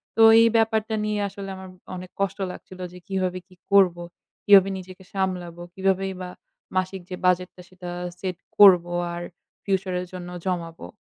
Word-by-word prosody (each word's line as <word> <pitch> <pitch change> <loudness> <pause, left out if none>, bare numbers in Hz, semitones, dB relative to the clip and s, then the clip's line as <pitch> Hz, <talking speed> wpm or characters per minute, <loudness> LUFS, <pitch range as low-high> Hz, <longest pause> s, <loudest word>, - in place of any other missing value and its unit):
তো 225 - +2 0.2
এই 230 - +6
ব্যাপারটা 220 0 +1
নিয়ে 210 -1 -1
আসলে 195 0 -8
আমার 190 0 -10 0.3
অনেক 180 0 -9
কষ্ট 195 0 0
লাগছিল 185 0 -12
যে - - -10
কিভাবে 185 -2 -1
কি 185 - -20 0.2
করবো, 180 -3 +4 0.4
কিভাবে 195 -1 +7
নিজেকে 185 0 -11
সামলাবো, 180 -3 -3
কিভাবেই 195 0 0
বা 180 - -5 0.5
মাসিক 185 0 -1
যে 185 - -4
বাজেটটা 180 0 +1
সেটা 185 -1 -9 0.3
set 185 -2 -4 0.2
করবো 180 -4 +7 0.2
আর 175 - -5 0.4
future 190 -2 -1
এর 180 - -6
জন্য 180 -1 -7 0.2
জমাবো। 170 -3 -3
185 Hz, 160 wpm, -24 LUFS, 180-195 Hz, 0.5 s, কিভাবে